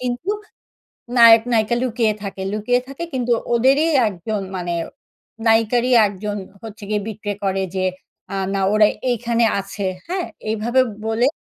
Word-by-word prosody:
কিন্তু 250 +9 -3 0.9
নায়ক, 230 -1 +9
নায়িকা 220 +1 +2
লুকিয়ে 230 -3 +1
থাকে 195 -1 -6
লুকিয়ে 230 +4 +1
থাকে 275 +5 -7
কিন্তু 245 -2 -1 0.2
ওদেরই 270 +7 +4 0.2
একজন 205 +2 -4 0.2
মানে 175 -1 -3 0.7
নায়িকারই 230 +3 +3 0.2
একজন 205 +1 -5 0.3
হচ্ছে 215 -1 -9
গিয়ে 210 -1 0
betray 205 -2 -4
করে 195 0 0
যে 185 0 0 0.7
না 195 - 0
আ - - +3
ওরা 215 0 +6 0.2
এইখানে 235 0 +1
আছে। 195 0 -5 0.2
হ্যাঁ? 365 0 -2 0.2
এইভাবে 235 +4 +2 0.3
বলে। 225 +3 +2
225 Hz, 135 wpm, -20 LUFS, 205-245 Hz, 0.9 s, নায়ক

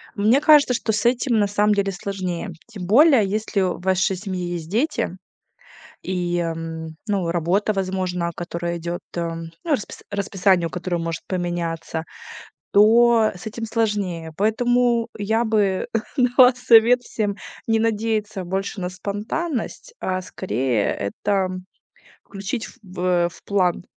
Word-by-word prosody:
Мне 220 +6 +4
кажется, 295 -4 +6
что 220 -1 -1
с 210 0 -1
этим 245 -1 +2
на 205 - +3
самом 210 +1 +2
деле 200 -1 0
сложнее. 185 0 -4 0.2
Тем 205 -6 -8
более 260 - +6
если 210 0 -1
в 185 -1 -1
вашей 190 +1 +1
семье 180 -2 -4
есть 165 -2 -6
дети 225 - 0 0.9
и, 175 -1 -1
м, 165 -1 -4
ну, 195 -5 0
работа, 180 +5 +1
возможно, 185 -2 -2
которая 170 0 -4
идет, 170 +1 -4
эм, 165 -1 -4
ну, 330 - -3
распис 260 -8 -2
расписание, 195 -3 +1
у - - -9
которое 180 0 -3
может 165 -1 -3
поменяться, 170 -3 -3 0.7
то 225 +1 +5
с 180 - -11
этим 225 +1 -5
сложнее. 205 -8 -1
Поэтому, 235 +2 +2
э, - - -4
я 220 +3 +1
бы 210 -4 +1 0.3
дала 250 -1 +6
совет 245 0 +5
всем 205 -4 -2 0.3
не 225 -1 +2
надеяться 215 -3 -1
больше 195 +3 -3
на 180 - -2
спонтанность, 225 - -4
а 185 0 -1
скорее 120 - -1 0.3
это, 205 - -1 0.2
м, 185 0 -6 0.6
включить 200 +4 -5
в, 185 -3 -11
э, 180 -1 +2
в - - -18
план. 180 -3 0
195 Hz, 145 wpm, -22 LUFS, 175-225 Hz, 0.9 s, кажется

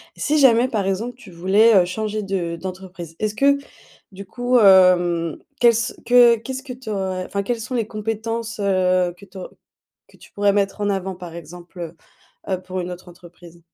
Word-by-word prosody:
Si 305 +1 0
jamais, 250 -3 +5
par 210 -6 -2
exemple, 220 +6 -2
tu 220 -7 -15
voulais, 200 +6 +4
heu, 180 -2 +5
changer 215 +3 -3
de 180 -4 -3
d'entreprise, 185 -2 -8
est-ce 215 -1 -2
que 280 +4 +3 0.6
du 200 +1 -9
coup, 245 +5 0
hem, 180 -4 +4 0.2
quelle 235 -1 +6
ce 225 0 -1
que 240 -1 +6
qu'est-ce 260 +4 -7
que 265 -3 -8
tu 250 -2 -11
aurais, 190 -3 -3
enfin, 200 0 -3
quelles 235 +2 -3
sont 250 +3 -6
les 230 -3 0
compétences, 225 +1 -4
heu, 185 -2 +1
que 200 +3 -16
tu 190 - -18
aur 185 - -8 0.6
que - - -21
tu - - -18
pourrais 205 0 +2
mettre 200 +1 -1
en 205 - 0
avant, 190 -1 -2
par 175 -2 -10
exemple, 175 +2 -11
heu 170 -1 -7 0.6
heu, 185 - -6
pour 185 0 -6
une 180 0 -4
autre 180 0 -11
entreprise? 175 0 -16
195 Hz, 195 wpm, -21 LUFS, 180-225 Hz, 0.6 s, quelle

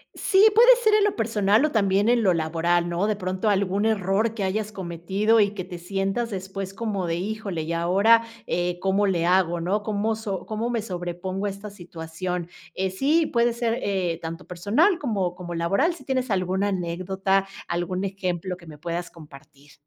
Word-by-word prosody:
Sí, 390 +2 +4
puede 485 +3 +8
ser 435 -1 +4
en 425 -1 +5
lo 415 - 0
personal 215 +1 +2
o 305 - -1
también 200 -1 +2
en 240 -1 +4
lo 190 -4 +3
laboral, 170 +2 +1
¿no? 175 +4 0
De 215 - +1
pronto, 185 +2 -2
algún 200 +1 +1
error 215 +1 +1
que 205 - -2
hayas 210 +3 -1
cometido 190 +4 0
y 205 -1 +3
que 185 - -4
te 180 -1 -8
sientas 195 +6 -2
después 195 -1 -5
como 200 -4 -2
de, 165 - 0
híjole, 195 -3 -3
y 165 +2 -3
ahora 200 +7 +4 0.2
eh, 175 0 -1
¿cómo 195 +2 +1
le 175 -3 +1
hago, 175 -1 +2
no? 195 +5 0
¿Cómo 215 +1 -1
so 200 -5 -5
cómo 220 +2 -3
me 230 -3 -1
sobrepongo 185 +1 -4
a - - 0
esta 200 +1 -8
situación? 175 -1 -5 0.3
Eh, 190 0 -1
sí, 300 - +2
puede 235 -3 +1
ser, 235 0 -1
eh, 180 -4 -1
tanto 165 +2 -6
personal 225 - +2
como 200 -10 -1
como 175 -1 -6
laboral, 200 - +1
si - - -14
tienes 260 -1 -1
alguna 190 0 0
anécdota, 190 +1 -1 0.2
algún 175 +2 -2
ejemplo 185 -2 -3
que 170 -2 -16
me 150 -1 -10
puedas 170 +2 -4
compartir. 145 -2 -16
195 Hz, 185 wpm, -24 LUFS, 175-215 Hz, 0.3 s, puede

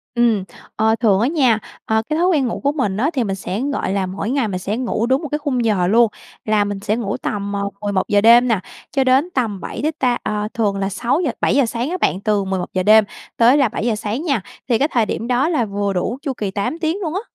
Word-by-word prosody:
Ừm, 230 -5 +2 0.3
ờ, 220 +1 +2
thường 205 -5 +3
á 235 - +2
nha, 260 -8 +2 0.3
ờ, 220 0 +1
cái 310 - 0
thói 355 - +3
quen 290 -8 +2
ngủ - - -3
của 280 - +2
mình 235 -10 -1
á, 275 +7 +1
thì 260 -5 0
mình 195 -2 -2
sẽ, 195 +3 -4
gọi 195 - -2
là, 195 -1 0
mỗi 190 +3 -4
ngày 265 -3 +1
mình 185 -2 -3
sẽ 205 +4 -3
ngủ 240 -3 -1
đúng 260 +3 +1
một 310 - -4
cái 295 +2 -2
khung 255 -6 -1
giờ 190 -5 +2
luôn. 230 +4 +5 0.4
Là 215 -1 +2
mình 205 -1 -4
sẽ 210 +2 -1
ngủ 215 -4 -3
tầm, 200 -1 -3
ờ, 200 0 -2
11:00 205 0 +1
đêm 235 +3 +6
nè, 225 -4 +2 0.3
cho 270 -2 +2
đến 265 +6 +3
tầm 225 -7 -1
7 - - -6
đến 310 +2 0
ta 250 -2 +2
ờ, 210 0 -2
thường 205 -4 0
là 195 0 -1
6:00, 245 - 0
7:00 275 -3 +3
sáng 235 +4 -3
á 365 - -2
bạn, 190 - 0
từ 205 -1 +1
11:00 185 -1 -2
đêm 215 +2 +7 0.3
tới 240 +4 +5
là 275 -6 +3
7:00 225 +1 -1
sáng 220 +6 -3
nha. 275 - 0 0.3
Thì 230 - +3
cái 285 - +2
thời 230 -3 +2
điểm 225 +2 -4
đó 255 +6 +2
là 290 -9 +1
vừa 200 -1 -2
đủ 185 +7 -2
chu 285 -3 -3
kỳ 210 -6 -4
8 205 +12 -3
tiếng 325 +3 -1
luôn 325 -3 -3
á. 385 - -2
225 Hz, 255 wpm, -19 LUFS, 205-265 Hz, 0.4 s, đêm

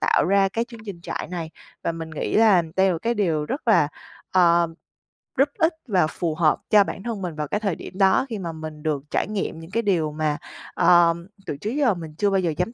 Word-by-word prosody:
tạo - - +3
ra 195 +1 +3
cái 230 +4 -2
chương 235 -2 -12
trình 190 -4 -7
trại - - -5
này. 170 -3 -4 0.3
Và 170 - -1
mình 165 -1 -7
nghĩ 155 - -3
là 210 -5 +6
đây 190 0 +4
là 185 - +2
một 165 - -4
cái 235 +1 +1
điều 165 -8 0
rất 265 - -4
là, 175 -9 +5 0.4
ờ, 170 -2 +4 0.7
rất - - +5
ích 335 -2 +3
và 185 -8 +3
phù 160 0 -3
hợp 155 -2 +3
cho 210 -1 +7
bản 195 0 -6
thân 230 -4 -4
mình 175 -4 -4
vào 150 -1 -3
cái 205 - -1
thời 200 -6 -1
điểm - - -10
đó, 195 +5 +4
khi 220 -3 -4
mà 170 -3 -4
mình 155 -1 -8
được 150 -3 -1
trải - - 0
nghiệm 200 -6 -3
những 165 +2 -11
cái 230 +2 0
điều 170 -7 +1
mà, 150 -1 -1 0.4
ờ, 175 -1 +5 0.3
từ 140 - -4
trước 205 - -4
giờ 270 -4 +2
mình 160 -4 -8
chưa 205 - +2
bao 195 -1 +2
giờ 170 -4 0
dám 180 +7 -1
180 Hz, 245 wpm, -23 LUFS, 160-205 Hz, 0.7 s, cho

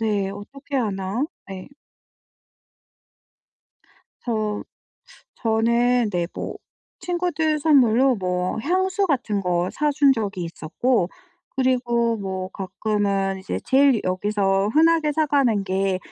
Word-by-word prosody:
네 205 -3 0
어떻게 275 +8 -7
하나. 205 +1 -1 0.2
네. 190 -1 -8 2.5
저 215 -3 -2 0.7
저는 235 +1 +2
네 175 -2 -1
뭐 - - -5 0.4
친구들 340 -3 0
선물로 265 -4 +4
뭐 180 +1 -2
향수 375 - +1
같은 245 - 0
거 180 -1 0
사 300 -1 0
준 280 -1 +5
적이 205 -7 -3
있었고 175 +5 -1 0.5
그리고 240 -3 +1
뭐 190 -2 -4
가끔은 195 0 -1
이제 190 - -4
제일 270 -3 +4
여기서 195 +1 +1
흔하게 320 -1 +4
사 310 +1 +1
가는 260 -8 +2
게 190 0 0
225 Hz, 195 characters per minute, -23 LUFS, 195-275 Hz, 2.5 s, 준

